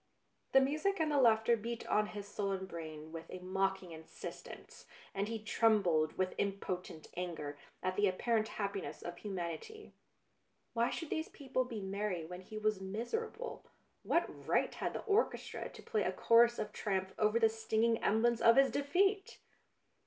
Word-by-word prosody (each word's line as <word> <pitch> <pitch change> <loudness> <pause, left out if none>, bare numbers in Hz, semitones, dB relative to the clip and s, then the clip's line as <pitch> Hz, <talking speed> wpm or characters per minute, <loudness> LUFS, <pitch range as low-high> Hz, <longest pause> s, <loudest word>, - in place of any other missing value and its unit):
The 270 - +8
music 310 +9 +1
and 315 -1 +2
the 290 - +3
laughter 225 -1 +5
beat 230 +1 -5
on 210 0 +2
his 205 -1 -7
sullen 195 -2 -2
brain 160 -3 -7
with 165 0 -8
a - - -6
mocking 190 0 -1
insistence, 160 0 -9 0.3
and 200 +1 -1
he 225 +1 -2
trembled 210 -8 +2
with 185 0 0
impotent 185 -5 -3
anger 160 -5 -4 0.2
at 185 0 0
the 205 +1 +3
ap 185 - -4
parent 225 -2 +1
happiness 200 -2 -4
of 175 - -6
humanity. 195 - -5 0.8
Why 235 +1 +2
should 325 -3 -5
these 315 +1 -1
people 260 -3 -2
be 230 -4 -5
merry 195 -3 -2
when 180 +2 -8
he 215 +3 -9
was 215 -2 0
miser 235 - -3
able, 480 +2 -7 0.4
what - - +2 0.2
right - - +2
had - - -3
the - - -4
orchestra 430 0 0
to - - -13
play 455 -1 0
a - - +1
chorus 235 +1 +5
of 210 0 -4
triumph 190 -2 -1
over 215 +1 +3
the 225 - +6
stinging 225 +1 +1
em 220 +2 +3
blems 235 -1 +3
of 230 0 +7
his 270 0 +5
defeat 385 +8 +1
215 Hz, 170 wpm, -35 LUFS, 185-240 Hz, 0.8 s, The